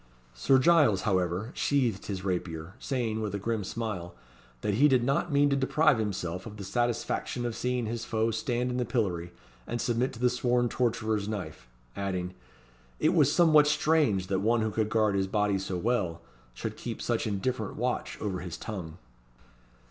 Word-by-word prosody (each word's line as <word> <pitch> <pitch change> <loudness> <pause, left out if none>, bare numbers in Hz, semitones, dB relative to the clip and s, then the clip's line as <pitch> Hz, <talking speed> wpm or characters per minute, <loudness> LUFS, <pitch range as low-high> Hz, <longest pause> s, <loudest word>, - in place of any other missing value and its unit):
Sir - - +3
Giles, 135 - +4
however, 95 +2 0
sheathed 125 -9 0
his 95 -2 -4
rapier, 85 -2 -3
saying, 115 -5 -2
with 105 -2 -2
a - - 0
grim 110 +1 -2
smile, 95 -5 -4 0.5
"that 105 - 0
he 135 +9 +5
did 130 -4 +3
not 140 +6 0
mean 145 0 +4
to - - +3
deprive 140 0 +3
himself 90 -3 -3
of 105 -1 -9
the 100 - -6
satisfaction 120 +3 -1
of 120 -2 -2
seeing 125 -1 -1
his 115 +1 -3
foe 115 0 0
stand 120 +3 -1
in 125 - -2
the 125 - +1
pillory, 95 -8 -1 0.4
and 120 - -3
submit 120 +2 0
to 115 - -10
the 125 0 +3
sworn 125 -1 +1
torturer's 110 -4 0
knife;" 105 - -5 0.3
adding, 90 -2 -3 0.7
"it - - +3
was - - +4
somewhat 155 -4 +6
strange 150 - +2
that 95 0 0
one 115 +2 +2
who 110 0 0
could 110 0 0
guard 110 -2 +2
his 95 -1 +1
body 105 -1 +1
so 95 -1 -3
well, 90 -5 -1 0.3
should - - -5
keep - - -5
such - - -1
indifferent 110 +2 -2
watch 125 +2 -2
over 95 -4 -2
his 90 -1 -6
tongue." 90 -7 -6
110 Hz, 180 wpm, -29 LUFS, 95-125 Hz, 0.7 s, somewhat